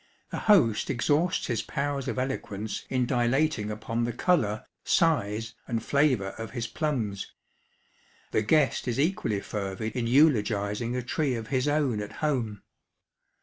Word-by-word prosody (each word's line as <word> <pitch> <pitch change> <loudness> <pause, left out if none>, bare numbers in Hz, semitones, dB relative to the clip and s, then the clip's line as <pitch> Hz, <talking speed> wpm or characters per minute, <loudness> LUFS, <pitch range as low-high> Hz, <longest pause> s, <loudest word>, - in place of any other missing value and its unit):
The - - -3
host 160 - +4
exhausts 145 +7 +1
his 115 -4 -1
powers 140 -1 -2
of - - -2
eloquence 110 -5 -3
in 130 -1 +1
dilating 120 -1 +1
upon 110 +2 -2
the 120 - 0
colour, 115 - +1 0.2
size, 115 -8 +1
and 115 -2 -2
flavour 135 -9 +2
of 115 - -5
his 115 - -1
plums; 115 - -2 1.0
the - - +2
guest 140 +6 +2
is 120 +1 -1
equally 140 - 0
fervid 100 +3 -4
in 120 -2 -1
eulogising 115 -4 +2
a 125 - -2
tree 135 +1 0
of 115 -1 -6
his 130 0 +1
own 145 -7 +1
at 105 - -7
home. 120 -9 -2
120 Hz, 145 wpm, -28 LUFS, 110-145 Hz, 1.0 s, host